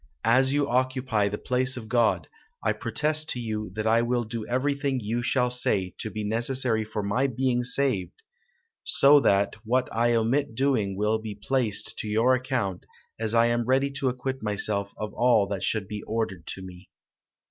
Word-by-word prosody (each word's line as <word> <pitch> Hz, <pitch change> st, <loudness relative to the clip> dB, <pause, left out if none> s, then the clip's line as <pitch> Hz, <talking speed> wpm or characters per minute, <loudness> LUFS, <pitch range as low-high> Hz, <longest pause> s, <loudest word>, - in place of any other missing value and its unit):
as 130 Hz, +4 st, +4 dB
you 145 Hz, 0 st, +1 dB
occupy 130 Hz, -4 st, +1 dB
the 105 Hz, -, -4 dB
place 130 Hz, +2 st, 0 dB
of 115 Hz, -3 st, -7 dB
God, 115 Hz, -1 st, +2 dB, 0.4 s
I -, -, +2 dB
protest 155 Hz, +1 st, -1 dB
to 125 Hz, -, 0 dB
you 110 Hz, -3 st, -4 dB
that 110 Hz, 0 st, -3 dB
I 115 Hz, +1 st, +4 dB
will 120 Hz, 0 st, 0 dB
do 115 Hz, -1 st, -6 dB
everything 140 Hz, +1 st, 0 dB
you 115 Hz, +2 st, -2 dB
shall 125 Hz, 0 st, +1 dB
say 100 Hz, -7 st, +1 dB
to 110 Hz, -, -3 dB
be 110 Hz, 0 st, -5 dB
necessary 115 Hz, +1 st, 0 dB
for 105 Hz, -1 st, -4 dB
my 100 Hz, +7 st, +1 dB
being 125 Hz, -1 st, 0 dB
saved; 125 Hz, -8 st, -1 dB, 0.6 s
so 145 Hz, +1 st, +6 dB
that 100 Hz, -6 st, +2 dB
what 125 Hz, +3 st, +1 dB
I 120 Hz, +1 st, +2 dB
omit 115 Hz, +2 st, 0 dB
doing 115 Hz, -8 st, 0 dB
will 105 Hz, +2 st, +1 dB
be 110 Hz, -2 st, -6 dB
placed 105 Hz, -2 st, -1 dB
to -, -, -3 dB
your 115 Hz, +4 st, +3 dB
account, 125 Hz, -8 st, -2 dB, 0.3 s
as 110 Hz, 0 st, -1 dB
I 115 Hz, 0 st, +5 dB
am 120 Hz, 0 st, +1 dB
ready 135 Hz, +3 st, +2 dB
to 135 Hz, -1 st, -1 dB
acquit 130 Hz, +1 st, -4 dB
myself 100 Hz, -1 st, -1 dB
of 105 Hz, -1 st, -5 dB
all 120 Hz, -3 st, +3 dB
that 100 Hz, -2 st, -3 dB
shall 110 Hz, -, 0 dB
be 105 Hz, -1 st, -5 dB
ordered 100 Hz, -6 st, -3 dB
to 95 Hz, -, -5 dB
me." 90 Hz, 0 st, -12 dB
115 Hz, 180 wpm, -26 LUFS, 105-130 Hz, 0.6 s, so